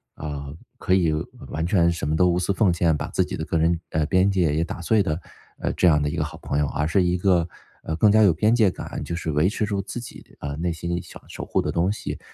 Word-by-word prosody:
呃， 70 Hz, -1 st, -6 dB, 0.2 s
可 95 Hz, -, 0 dB
以 85 Hz, -4 st, +3 dB, 0.3 s
完 80 Hz, +1 st, -3 dB
全 85 Hz, -1 st, +3 dB
什 85 Hz, -4 st, -3 dB
么 80 Hz, -, +1 dB
都 90 Hz, -, +4 dB
无 85 Hz, -, +1 dB
私 90 Hz, +2 st, 0 dB
奉 95 Hz, -3 st, +3 dB
献， 85 Hz, -2 st, +2 dB
把 -, -, -4 dB
自 -, -, +1 dB
己 -, -, -5 dB
的 80 Hz, -, -4 dB
个 85 Hz, -, -1 dB
人， 80 Hz, +1 st, +2 dB
呃， 80 Hz, -1 st, +1 dB
边 95 Hz, +2 st, +3 dB
界 90 Hz, -6 st, +1 dB
也 80 Hz, -, +1 dB
打 85 Hz, -, -6 dB
碎 105 Hz, +5 st, +3 dB
的， 80 Hz, -4 st, -1 dB, 0.4 s
呃， -, -, -1 dB
这 -, -, +3 dB
样 75 Hz, -3 st, +4 dB
的 75 Hz, -, 0 dB
一 -, -, -4 dB
个 -, -, +1 dB
好 -, -, -7 dB
朋 70 Hz, -, -2 dB
友， 75 Hz, -, +1 dB
而 75 Hz, -, -1 dB
是 95 Hz, +4 st, +2 dB
一 90 Hz, 0 st, +1 dB
个， 90 Hz, -2 st, +2 dB, 0.4 s
呃， 80 Hz, -, -3 dB
更 105 Hz, +5 st, +4 dB
加 110 Hz, +1 st, +5 dB
有 95 Hz, -5 st, +5 dB
边 105 Hz, +8 st, +2 dB
界 110 Hz, -4 st, +4 dB
感， -, -, -6 dB
就 85 Hz, -, -4 dB
是 80 Hz, -2 st, -3 dB
维 75 Hz, +3 st, +2 dB
持 105 Hz, +1 st, -1 dB
住 100 Hz, -2 st, -2 dB
自 105 Hz, +4 st, -6 dB
己， 120 Hz, -, -12 dB
呃， 70 Hz, 0 st, -4 dB
内 85 Hz, +2 st, -1 dB
心 85 Hz, +1 st, -3 dB
想 -, -, -13 dB
守 -, -, -7 dB
护 -, -, 0 dB
的 -, -, -2 dB
东 85 Hz, +3 st, +1 dB
西。 105 Hz, -, -5 dB
85 Hz, 295 characters per minute, -24 LUFS, 80-95 Hz, 0.4 s, 加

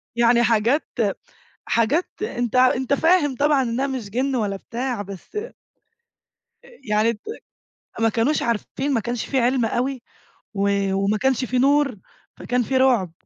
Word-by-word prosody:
يعني 235 Hz, 0 st, +4 dB
حاجات 235 Hz, +6 st, +2 dB, 0.8 s
حاجات 240 Hz, +10 st, +1 dB, 0.2 s
أنت 245 Hz, -, -3 dB
أنت 255 Hz, +1 st, +3 dB
فاهم 320 Hz, -2 st, +3 dB
طبعًا 290 Hz, 0 st, +3 dB
إنها 250 Hz, +2 st, -1 dB
مش 255 Hz, -7 st, -5 dB
جِن 260 Hz, +4 st, -1 dB
ولا 205 Hz, -4 st, -1 dB
بتاع، 240 Hz, +2 st, -4 dB
بس 200 Hz, -, -11 dB, 1.3 s
آآ -, -, -16 dB, 0.2 s
يعني 215 Hz, +2 st, +2 dB
ت 210 Hz, -, -14 dB, 0.8 s
ما 225 Hz, 0 st, +3 dB
كانوش 235 Hz, +7 st, +1 dB
عارفين، 235 Hz, +5 st, -2 dB
ما 235 Hz, -, +2 dB
كانش 240 Hz, +1 st, -3 dB
في 270 Hz, -, 0 dB
عِلم 250 Hz, 0 st, +2 dB
أوي 250 Hz, +3 st, -2 dB, 0.5 s
و 200 Hz, 0 st, +1 dB, 0.3 s
وما 200 Hz, +2 st, +1 dB
كانش 265 Hz, +1 st, +1 dB
في 255 Hz, 0 st, -1 dB
نور، 275 Hz, -1 st, +3 dB, 0.4 s
فكان 250 Hz, 0 st, 0 dB
في 260 Hz, +3 st, -1 dB
رُعب. 245 Hz, -10 st, +3 dB
245 Hz, 145 wpm, -22 LUFS, 225-270 Hz, 1.3 s, يعني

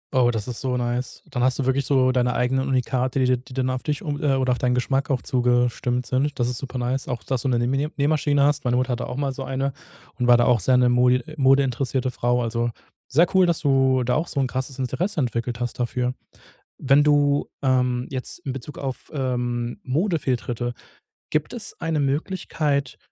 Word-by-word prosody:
Oh, 125 Hz, -2 st, +4 dB
das 110 Hz, -2 st, -2 dB
ist 120 Hz, -, -5 dB
so 130 Hz, -2 st, -1 dB
nice. 120 Hz, +1 st, -3 dB
Dann 125 Hz, -3 st, -2 dB
hast 130 Hz, -1 st, +2 dB
du 135 Hz, -, -1 dB
wirklich 130 Hz, +1 st, +1 dB
so 130 Hz, -2 st, +3 dB
deine 125 Hz, -1 st, +1 dB
eigenen 130 Hz, +2 st, +1 dB
Unikate, 130 Hz, 0 st, 0 dB
die 130 Hz, -, +3 dB
dir 125 Hz, 0 st, +3 dB
die 125 Hz, +1 st, -13 dB
dann 130 Hz, -1 st, 0 dB
auf 130 Hz, -, -3 dB
dich 150 Hz, -1 st, -3 dB
oder, 145 Hz, -1 st, -3 dB
äh, 130 Hz, -1 st, 0 dB
auf 125 Hz, -, 0 dB
deinen 125 Hz, -1 st, +1 dB
Geschmack 135 Hz, +3 st, 0 dB
auch 130 Hz, -3 st, 0 dB
zugestimmt 125 Hz, 0 st, +1 dB
sind. 135 Hz, +4 st, -1 dB
Das 120 Hz, -, +2 dB
ist 125 Hz, -, -2 dB
super 130 Hz, -2 st, -6 dB
nice. 125 Hz, +2 st, -2 dB
Auch, 120 Hz, -4 st, -4 dB
dass 130 Hz, -3 st, -1 dB
du 135 Hz, -, -2 dB
'ne 125 Hz, -, +2 dB
Nähmine 135 Hz, +5 st, 0 dB
Nähmaschine 145 Hz, -1 st, +2 dB
hast, 145 Hz, 0 st, +2 dB
meine 125 Hz, 0 st, +1 dB
Mutter 130 Hz, +1 st, 0 dB
hatte 125 Hz, 0 st, -2 dB
auch -, -, -5 dB
mal 140 Hz, -1 st, -1 dB
so 135 Hz, -, -6 dB
eine 135 Hz, +1 st, -2 dB, 0.5 s
und 125 Hz, -, +1 dB
war 120 Hz, -1 st, +7 dB
da 120 Hz, -, +3 dB
auch 125 Hz, -3 st, +4 dB
sehr 125 Hz, +7 st, +3 dB
'ne 125 Hz, 0 st, +4 dB
modi 125 Hz, +1 st, +4 dB
äh, 155 Hz, -, -10 dB
modeinteressierte 130 Hz, -1 st, +2 dB
Frau. 120 Hz, +1 st, 0 dB
Also, 115 Hz, +1 st, -1 dB, 0.4 s
sehr 160 Hz, +6 st, +5 dB
cool, 185 Hz, -2 st, +6 dB
dass 170 Hz, -, 0 dB
du 135 Hz, -3 st, +3 dB
da 125 Hz, +1 st, 0 dB
auch 160 Hz, +3 st, 0 dB
so 140 Hz, -, -2 dB
'n 135 Hz, -, +2 dB
krasses 130 Hz, +1 st, -4 dB
Interesse 135 Hz, -, -2 dB
entwickelt 120 Hz, -2 st, -2 dB
hast 120 Hz, +2 st, -4 dB
dafür. 125 Hz, +1 st, -1 dB, 0.7 s
Wenn 140 Hz, +2 st, +4 dB
du 145 Hz, -1 st, +3 dB
ähm, 125 Hz, -1 st, +1 dB
jetzt 130 Hz, +6 st, -5 dB
in 140 Hz, -6 st, -4 dB
Bezug 135 Hz, +3 st, -8 dB
auf, 135 Hz, +1 st, -6 dB
ähm, 120 Hz, -3 st, -2 dB
Modefehltritte, 130 Hz, -, -1 dB, 0.6 s
gibt 155 Hz, -1 st, -1 dB
es 235 Hz, -4 st, -5 dB
eine 160 Hz, -2 st, 0 dB
Möglichkeit, 145 Hz, -1 st, -1 dB
130 Hz, 215 wpm, -23 LUFS, 125-140 Hz, 0.7 s, war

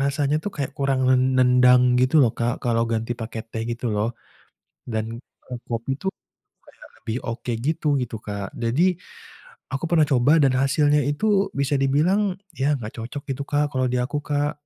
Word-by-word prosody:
rasanya 140 Hz, +1 st, +1 dB
tuh 205 Hz, -, -2 dB
kayak 140 Hz, -1 st, -3 dB
kurang 135 Hz, -1 st, +1 dB
nen 130 Hz, 0 st, +4 dB
nendang 125 Hz, 0 st, +5 dB, 0.2 s
gitu 130 Hz, +4 st, +1 dB
loh, 115 Hz, -, +4 dB
Kak, 120 Hz, 0 st, 0 dB
kalau 115 Hz, -1 st, +1 dB
ganti 115 Hz, +1 st, -1 dB
pake 115 Hz, 0 st, -5 dB
teh 115 Hz, -1 st, -4 dB
gitu 120 Hz, +1 st, -5 dB
loh, 105 Hz, +2 st, 0 dB, 0.8 s
dan 110 Hz, 0 st, -1 dB, 0.6 s
kopi 115 Hz, +2 st, -4 dB
itu 190 Hz, -, -9 dB, 0.7 s
kayak -, -, -16 dB
lebih 110 Hz, +1 st, -4 dB
oke 115 Hz, +1 st, -4 dB
gitu 160 Hz, 0 st, -1 dB
gitu, 120 Hz, -2 st, -4 dB
Kak. 100 Hz, -1 st, -4 dB
Jadi, 120 Hz, +8 st, +1 dB, 0.9 s
aku 135 Hz, +2 st, -3 dB
pernah 160 Hz, -3 st, +4 dB
coba 130 Hz, +2 st, +4 dB
dan 135 Hz, -1 st, +3 dB
hasilnya 145 Hz, +2 st, +3 dB
itu 145 Hz, +9 st, -2 dB, 0.3 s
bisa 140 Hz, +1 st, +1 dB
dibilang, 155 Hz, +10 st, +2 dB, 0.4 s
ya 135 Hz, -, +1 dB
enggak 110 Hz, -5 st, -6 dB
cocok 125 Hz, +5 st, -6 dB
gitu, 140 Hz, +2 st, -3 dB
Kak, 145 Hz, 0 st, +3 dB
kalau 130 Hz, -1 st, 0 dB
di 125 Hz, -, 0 dB
aku, 145 Hz, +3 st, -2 dB
Kak. 145 Hz, 0 st, 0 dB
130 Hz, 170 wpm, -23 LUFS, 115-145 Hz, 0.9 s, nendang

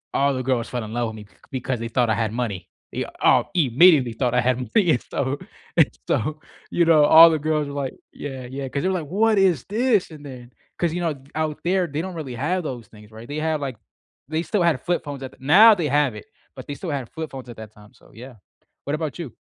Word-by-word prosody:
all 140 Hz, 0 st, +2 dB
the 130 Hz, -, -2 dB
girls 125 Hz, -2 st, -1 dB
fell 125 Hz, -2 st, -4 dB
in 110 Hz, -, -8 dB
love 120 Hz, -2 st, -1 dB
with 110 Hz, -, -9 dB
me 105 Hz, -, -10 dB
c -, -, -27 dB, 0.2 s
because 130 Hz, -2 st, -3 dB
they 115 Hz, 0 st, -4 dB
thought 120 Hz, -1 st, +1 dB
I 110 Hz, -, +2 dB
had 110 Hz, -1 st, -1 dB
money. 100 Hz, -7 st, -3 dB, 0.2 s
Yeah -, -, -4 dB
all -, -, +3 dB
immediately 145 Hz, -3 st, +4 dB
thought 120 Hz, +1 st, -1 dB
I 125 Hz, -, +3 dB
had 125 Hz, 0 st, +1 dB
money 145 Hz, -, +1 dB
and 125 Hz, -, -1 dB
stuff, 135 Hz, -, -3 dB, 0.5 s
and -, -, +6 dB, 0.2 s
so 155 Hz, +6 st, -1 dB, 0.3 s
you 170 Hz, -, +2 dB
know, 155 Hz, -3 st, +5 dB
all 165 Hz, +2 st, +9 dB
the 160 Hz, -, +1 dB
girls 150 Hz, -1 st, -1 dB
were 140 Hz, -, -7 dB
like, 130 Hz, -, -4 dB, 0.2 s
"Yeah, 135 Hz, -3 st, -7 dB
yeah," 135 Hz, -1 st, -3 dB
'cause 140 Hz, +2 st, -3 dB
they 185 Hz, -, 0 dB
were 185 Hz, -1 st, 0 dB
like, 160 Hz, -, -7 dB, 0.2 s
"What 220 Hz, -2 st, +4 dB
is 180 Hz, -9 st, +3 dB
this?" 220 Hz, -2 st, +1 dB
and 150 Hz, -2 st, -12 dB
then 125 Hz, -3 st, -10 dB, 0.3 s
'cause 170 Hz, -2 st, +1 dB
you 175 Hz, -, -2 dB
know, 165 Hz, -2 st, 0 dB, 0.2 s
out 155 Hz, -1 st, -2 dB
there, 185 Hz, +1 st, +1 dB
they 145 Hz, +3 st, -3 dB
don't 185 Hz, -1 st, -6 dB
really 145 Hz, -6 st, -6 dB
have 175 Hz, +8 st, -1 dB
those 125 Hz, -6 st, -6 dB
things, 105 Hz, 0 st, -17 dB
right, 110 Hz, +2 st, -11 dB
they 145 Hz, +1 st, -5 dB
have, 155 Hz, -1 st, -1 dB
like 135 Hz, -4 st, -4 dB, 0.5 s
they 155 Hz, +2 st, -1 dB
still 175 Hz, +4 st, 0 dB
had 165 Hz, -7 st, +2 dB
flip 175 Hz, -, -1 dB
phones 140 Hz, -2 st, -6 dB
at 130 Hz, -, -5 dB
the -, -, -19 dB
now, 200 Hz, +11 st, +7 dB
they 170 Hz, -6 st, -1 dB
have 145 Hz, -4 st, +1 dB
it, 105 Hz, -, -10 dB, 0.3 s
but -, -, -9 dB
they 145 Hz, -, -4 dB
still 175 Hz, -, -6 dB
had 140 Hz, -5 st, -3 dB
flip 160 Hz, -1 st, -6 dB
phones 130 Hz, -2 st, -9 dB
at 120 Hz, -, -10 dB
that 110 Hz, -1 st, -10 dB
time, 105 Hz, 0 st, -18 dB
so -, -, -22 dB
yeah. 125 Hz, +2 st, -11 dB, 0.5 s
What 145 Hz, +2 st, -1 dB
about 155 Hz, 0 st, -4 dB
you? 145 Hz, -10 st, -6 dB
140 Hz, 260 wpm, -23 LUFS, 125-165 Hz, 0.5 s, all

